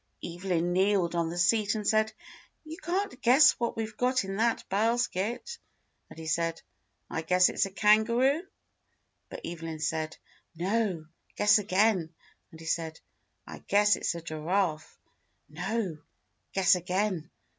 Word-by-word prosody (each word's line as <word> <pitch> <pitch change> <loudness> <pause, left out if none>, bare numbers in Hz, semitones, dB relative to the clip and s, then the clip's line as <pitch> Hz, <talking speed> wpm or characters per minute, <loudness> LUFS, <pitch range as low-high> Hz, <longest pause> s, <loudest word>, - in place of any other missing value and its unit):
Evelyn 175 0 -1
kneeled 190 -2 +2
on 170 -1 0
the 170 - -6
seat 210 +5 +2
and 210 -1 -3
said, 220 0 +2 0.5
"You 315 0 -8
can't 350 -4 -3
guess 260 +5 +7
what 235 -1 -2
we've 220 -1 -4
got 255 +1 +1
in 195 0 -5
that 230 +1 0
basket." 235 - -1 0.5
And - - -13
he 160 - -8
said, 165 +1 -1 0.5
"I 165 - -3
guess 180 +2 +4
it's - - 0
a - - -9
kangaroo." 235 - +3 0.8
And - - -8
Evelyn 165 -1 -6
said, 155 0 -2 0.4
"No; 185 -1 -1 0.3
guess 210 +1 +5
again." 195 -3 +2 0.4
And 160 - -14
he 165 - -11
said, 160 0 -2 0.5
"I - - -9
guess 205 +1 +3
it's - - -2
a 170 - -7
giraffe." 160 +1 -2 0.5
"No; 180 +1 -3 0.5
guess 195 0 +4
again." 180 -1 -1
195 Hz, 140 wpm, -29 LUFS, 170-220 Hz, 0.8 s, guess